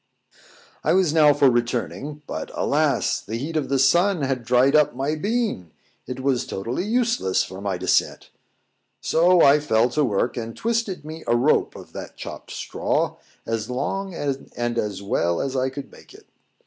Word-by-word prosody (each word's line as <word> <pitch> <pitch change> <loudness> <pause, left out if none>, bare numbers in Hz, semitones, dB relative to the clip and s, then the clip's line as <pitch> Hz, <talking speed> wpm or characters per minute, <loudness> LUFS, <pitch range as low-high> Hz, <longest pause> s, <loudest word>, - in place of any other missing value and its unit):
I - - +2
was 180 -5 +3
now 155 -2 +6
for 145 -1 +4
returning: 125 +4 -1
but, 80 - -5
alas! - - +1
the 110 - -6
heat 150 +7 -5
of 145 -4 -1
the 135 - +2
sun 170 +5 +3
had 130 -2 -1
dried 125 +4 +3
up 150 -4 +4
my 135 +4 -1
bean; 205 - -2 0.4
it 125 +1 -5
was 130 -2 0
totally 115 - -3
useless 230 - +1
for 95 +1 -9
my 100 -2 -2
descent: 95 +1 0 0.7
so 175 +2 +4
I 140 +2 +6
fell 120 -5 +2
to 150 +3 +1
work, 120 0 0
and 115 -1 -5
twisted 225 -8 -2
me 160 +1 -8
a 120 - +3
rope 130 +6 +2
of - - -12
that - - -8
chopped - - -8
straw, - - -2 0.3
as 115 0 -3
long 190 +9 -3
and 120 -5 -3
as 100 -2 -3
well 85 -3 0
as 135 -1 -2
I 130 0 +1
could 135 +1 -8
make - - -16
it. - - -16
135 Hz, 175 wpm, -23 LUFS, 120-160 Hz, 0.7 s, now